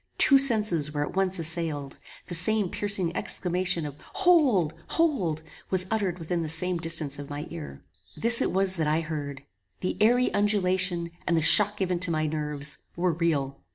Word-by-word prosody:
Two 275 -1 +5
senses 210 - +4
were 145 -1 -3
at - - -10
once 190 -1 +1
assailed. 160 -4 -1 0.3
The - - -8
same 195 +3 +6
piercing 195 -5 -1
exclamation 180 -2 -2
of 145 -1 -9
HOLD! 280 - +1
HOLD! 200 - -2 0.3
was 185 -1 +2
uttered 200 -5 -2
within 170 0 -4
the 160 - -5
same 175 +2 0
distance 160 -4 -2
of 145 - -9
my 145 +1 -7
ear. 165 -3 -10 0.3
This 230 +1 +6
it - - -1
was 190 0 +2
that 160 -2 -2
I 155 +2 0
heard. 145 -4 -7 0.4
The 185 - -4
airy 245 +3 +2
undulation, 185 -4 0 0.2
and 170 - +1
the - - +1
shock 210 +4 +5
given 185 -3 -2
to 185 0 -1
my 155 -1 -2
nerves, 150 -1 -3 0.2
were 175 0 -1
real. 145 -5 -3
175 Hz, 175 wpm, -25 LUFS, 155-195 Hz, 0.4 s, same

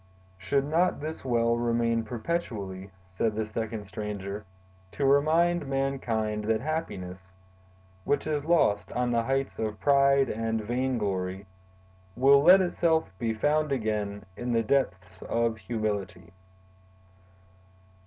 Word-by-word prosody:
"Should 135 +9 0
not 165 +5 +1
this 155 +2 -5
well 115 -2 +2
remain 115 -1 +1
perpetually," 110 - -4 0.2
said 105 +4 -1
the 110 0 -1
second 110 -1 -4
stranger, 105 0 -5 0.5
"to 140 - -1
remind 155 +4 +3
mankind 120 -6 -1
that 110 0 +1
happiness, 95 - -5 0.7
which 145 - 0
is 150 -2 -1
lost 105 - +2
on 125 0 0
the 115 -1 +2
heights 135 +3 -2
of 110 -1 -3
pride 140 -1 +4
and 115 0 -2
vainglory, 105 -5 -2 0.7
will 140 +2 +6
let 180 +5 +8
itself 165 - +1
be 115 -1 -1
found 150 +5 +1
again 105 -5 -2
in 120 +3 -3
the 115 0 +2
depths 95 -7 -1
of 115 -1 0
humility?" 105 -6 -4
115 Hz, 120 wpm, -28 LUFS, 105-140 Hz, 0.7 s, let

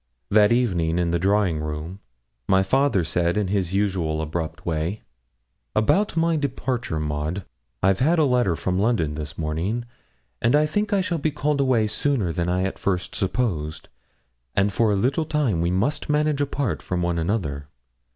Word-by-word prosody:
That 105 +1 +5
evening 90 -9 +1
in 85 -1 +1
the 85 - +1
drawing 95 -3 +2
room 75 +5 -5 0.5
my 95 0 +4
father 135 -2 +2
said, 85 +3 0
in 105 -3 0
his 95 -3 0
usual 95 -6 0
abrupt 80 +2 -4
way 85 +5 -2 0.7
'About 165 - +2
my 165 0 +2
departure, 130 - -2
Maud: 75 +5 -3 0.4
I've 95 0 +3
had 160 +7 +3
a 160 - +4
letter 125 -9 +2
from 90 +3 -1
London 100 -9 +1
this 75 -1 -6
morning, 85 +10 -2 0.6
and 120 +4 +3
I 150 +1 +4
think 205 +7 -1
I 200 -2 +3
shall 180 -3 -1
be 155 - +1
called 150 -1 0
away 125 -5 +3
sooner 105 - 0
than 85 0 -1
I 90 +1 +1
at 95 - -3
first 90 -3 -1
supposed, 95 -7 -2 0.7
and 100 0 +2
for 110 +3 +2
a - - +2
little 130 - +1
time 145 - 0
we 85 - +1
must 130 - 0
manage 150 -1 +1
apart 135 - -1
from 90 -1 -2
one 85 -1 0
another. 80 -6 -2
100 Hz, 170 wpm, -24 LUFS, 85-130 Hz, 0.7 s, That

